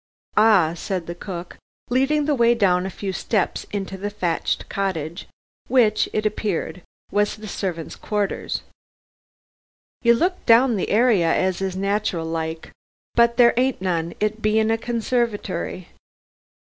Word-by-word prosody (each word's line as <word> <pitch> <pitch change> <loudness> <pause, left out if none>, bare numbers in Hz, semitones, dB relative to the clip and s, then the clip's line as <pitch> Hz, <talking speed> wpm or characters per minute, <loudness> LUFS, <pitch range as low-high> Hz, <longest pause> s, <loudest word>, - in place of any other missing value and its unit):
"Ah," 205 -7 +5
said 180 0 -3
the 170 - -5
cook, 175 -1 -8 0.3
leading 280 +4 +2
the 300 - +2
way 235 -2 +4
down 185 -4 +2
a - - -4
few 195 0 -5
steps 200 -1 -1
into 195 -1 -4
the 205 +2 -3
thatched 185 -5 -2
cottage, 170 -4 -3 0.4
which, 225 -5 +3
it 215 0 -1
appeared 205 -4 -2 0.3
was 205 0 +1
the 215 0 -10
servants' 175 -5 -4
quarters, 205 -2 -2 1.4
"you 235 -1 +5
looked 360 +8 -1
down 235 +1 +6
the 190 - -2
area 210 -7 +3
as 185 0 0
is 190 -1 -2
natural 195 -3 -1
like. 160 0 -4 0.4
But 235 0 +3
there 240 -1 +6
ain't 255 +2 +1
none, 170 -3 -2
it 215 +1 -1
being 220 +1 +2
a 225 - +2
conservitery!" 225 -7 -2
205 Hz, 140 wpm, -22 LUFS, 180-230 Hz, 1.4 s, down